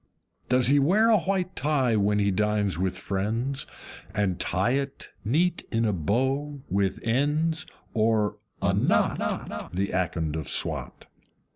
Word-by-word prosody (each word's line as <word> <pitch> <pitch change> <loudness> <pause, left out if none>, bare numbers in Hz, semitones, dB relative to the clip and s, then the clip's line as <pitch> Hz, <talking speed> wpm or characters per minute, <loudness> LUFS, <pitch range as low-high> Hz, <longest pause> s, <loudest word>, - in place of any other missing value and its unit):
Does 125 0 +4
he 145 +3 +5
wear 205 +11 +4
a 215 - +5
white 185 0 -1
tie 135 -5 +1
when 105 0 +2
he 100 -1 +2
dines 105 0 +1
with 90 +1 -1
friends, 110 +8 -2 0.5
And 95 -4 0
tie 95 +6 +1
it 135 +1 -2
neat 165 - +1
in 115 0 +1
a 105 - +1
bow 130 - -1
with 95 0 +1
ends, 150 +7 +1 0.3
or 110 -2 +1 0.2
a - - +3
KNOT, - - 0
The 100 +2 0
Akond 85 -4 -1
of 80 -3 -4
Swat? - - -2
115 Hz, 140 wpm, -26 LUFS, 100-145 Hz, 0.5 s, he